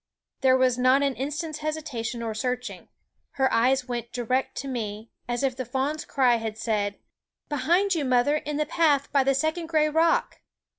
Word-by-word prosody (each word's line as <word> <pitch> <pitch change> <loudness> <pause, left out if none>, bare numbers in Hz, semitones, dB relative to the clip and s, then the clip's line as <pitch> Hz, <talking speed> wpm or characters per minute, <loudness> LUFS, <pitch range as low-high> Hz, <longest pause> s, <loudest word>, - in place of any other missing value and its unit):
There 260 -1 +4
was 255 -1 +2
not 255 +3 +4
an 280 -1 +1
instant's 300 +4 -4
hesitation 270 -7 -4
or 225 -1 -3
searching. 250 +2 -4 0.5
Her 265 -1 +1
eyes 255 +3 +2
went 240 -1 -4
direct 250 +2 -1
to 275 - -4
me, 220 -3 -5 0.2
as 240 +2 -1
if 265 -2 +1
the 255 - -3
fawn's 270 +5 -2
cry 250 -4 +3
had 220 -1 -5
said: 205 -3 -1 0.5
"Behind 340 +8 +2
you, 325 -4 0
mother, 255 +3 +2
in 300 -1 -4
the 305 - +1
path 295 -3 +2
by 275 -2 +3
the 270 0 +2
second 315 +4 -1
gray 310 -2 +2
rock!" 325 +2 +1
265 Hz, 180 wpm, -26 LUFS, 245-300 Hz, 0.5 s, There